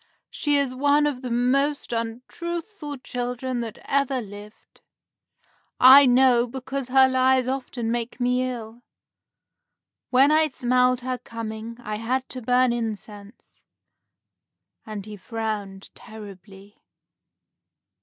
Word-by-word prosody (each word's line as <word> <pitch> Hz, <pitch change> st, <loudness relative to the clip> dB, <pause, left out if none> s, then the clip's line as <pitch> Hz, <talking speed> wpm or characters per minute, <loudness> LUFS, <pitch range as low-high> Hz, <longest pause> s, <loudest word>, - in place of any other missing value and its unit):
She 290 Hz, -1 st, +1 dB
is 275 Hz, -2 st, 0 dB
one 285 Hz, +3 st, +3 dB
of 280 Hz, -4 st, -2 dB
the 255 Hz, -, -5 dB
most 260 Hz, +3 st, 0 dB
untruthful 295 Hz, -, -5 dB
children 245 Hz, 0 st, -3 dB
that 225 Hz, -2 st, -6 dB
ever 275 Hz, -1 st, 0 dB
lived. 205 Hz, -1 st, -12 dB, 1.0 s
I 265 Hz, +2 st, +9 dB
know, 250 Hz, -1 st, +4 dB
because 265 Hz, +1 st, -5 dB
her 265 Hz, +1 st, +5 dB
lies 260 Hz, 0 st, +2 dB
often 255 Hz, -3 st, -3 dB
make 240 Hz, +1 st, -3 dB
me 250 Hz, 0 st, +1 dB
ill. 235 Hz, -1 st, -8 dB, 1.3 s
When 270 Hz, +3 st, +5 dB
I 310 Hz, 0 st, +4 dB
smelled 250 Hz, -2 st, +1 dB
her 255 Hz, 0 st, -3 dB
coming, 230 Hz, 0 st, -7 dB
I 215 Hz, -2 st, -4 dB
had 255 Hz, +4 st, -2 dB
to 255 Hz, -, -6 dB
burn 250 Hz, +1 st, +2 dB
incense;" 215 Hz, -2 st, -7 dB, 1.3 s
and 210 Hz, -2 st, -6 dB
he 210 Hz, -1 st, -9 dB
frowned 205 Hz, -2 st, -5 dB
terribly. 205 Hz, -2 st, -13 dB
245 Hz, 115 wpm, -24 LUFS, 225-265 Hz, 1.3 s, I